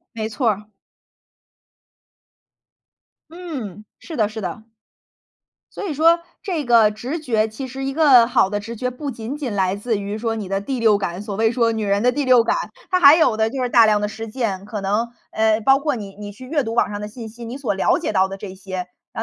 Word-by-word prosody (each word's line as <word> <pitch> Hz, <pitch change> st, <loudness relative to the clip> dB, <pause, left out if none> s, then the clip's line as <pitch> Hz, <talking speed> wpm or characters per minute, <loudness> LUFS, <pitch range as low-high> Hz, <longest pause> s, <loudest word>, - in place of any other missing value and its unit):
没 220 Hz, -1 st, -3 dB
错 235 Hz, +2 st, 0 dB
儿。 210 Hz, 0 st, -1 dB, 2.6 s
嗯， 270 Hz, -, -7 dB, 0.2 s
是 325 Hz, -, -8 dB
的， 215 Hz, -4 st, +2 dB
是 220 Hz, +1 st, -7 dB
的。 195 Hz, +3 st, -5 dB, 1.1 s
所 -, -, -5 dB
以 -, -, -2 dB
说 330 Hz, +4 st, +4 dB, 0.2 s
这 345 Hz, -8 st, -3 dB
个 230 Hz, -3 st, +5 dB
直 245 Hz, +10 st, -4 dB
觉 225 Hz, -8 st, 0 dB
其 220 Hz, +5 st, -7 dB
实 265 Hz, +1 st, -6 dB
一 270 Hz, -, -2 dB
个 270 Hz, -6 st, +6 dB
好 240 Hz, -6 st, +3 dB
的 205 Hz, +1 st, -2 dB
直 230 Hz, +3 st, -7 dB
觉， 250 Hz, +3 st, -2 dB
不 275 Hz, +3 st, -5 dB
仅 235 Hz, +3 st, -6 dB
仅 275 Hz, -6 st, -4 dB
来 190 Hz, -1 st, +1 dB
自 210 Hz, +2 st, -2 dB
于 200 Hz, +1 st, -4 dB
说 225 Hz, 0 st, -2 dB
你 210 Hz, -4 st, -5 dB
的 195 Hz, +1 st, -1 dB
第 255 Hz, +6 st, -3 dB
六 220 Hz, -3 st, +4 dB
感， 180 Hz, -2 st, -4 dB
所 205 Hz, -1 st, -5 dB
谓 220 Hz, +2 st, +2 dB
说 230 Hz, -1 st, +1 dB
女 220 Hz, -1 st, -2 dB
人 200 Hz, 0 st, +1 dB
的 250 Hz, -, +4 dB
第 290 Hz, +2 st, -1 dB
六 250 Hz, -3 st, +5 dB
感， -, -, +1 dB, 0.4 s
它 365 Hz, -, +3 dB
还 285 Hz, -1 st, +9 dB
有 255 Hz, -9 st, +3 dB
的 220 Hz, 0 st, +1 dB
就 265 Hz, -, -4 dB
是 250 Hz, -, 0 dB
大 235 Hz, -1 st, +6 dB
量 210 Hz, -1 st, +3 dB
的 210 Hz, -, 0 dB
实 225 Hz, +2 st, -7 dB
践， 215 Hz, -5 st, -3 dB
可 210 Hz, -1 st, -5 dB
能， 205 Hz, +4 st, 0 dB, 0.2 s
呃， 220 Hz, 0 st, +2 dB
包 270 Hz, +4 st, +4 dB
括 295 Hz, -2 st, -1 dB
你， 200 Hz, -3 st, -8 dB
你 205 Hz, 0 st, -7 dB
去 230 Hz, +6 st, -12 dB
阅 290 Hz, +1 st, 0 dB
读 225 Hz, -1 st, -4 dB
网 235 Hz, -, +2 dB
上 205 Hz, -, -4 dB
的 210 Hz, -, -5 dB
信 225 Hz, +1 st, -9 dB
息， 235 Hz, +2 st, -11 dB
你 240 Hz, +4 st, -6 dB
所 255 Hz, -7 st, -1 dB
了 195 Hz, -, +2 dB
解 -, -, -3 dB
到 190 Hz, 0 st, +3 dB
的 195 Hz, -, -6 dB
这 195 Hz, -1 st, -8 dB
些， 185 Hz, -1 st, -6 dB, 0.3 s
然 -, -, -5 dB
225 Hz, 245 characters per minute, -21 LUFS, 205-260 Hz, 2.6 s, 还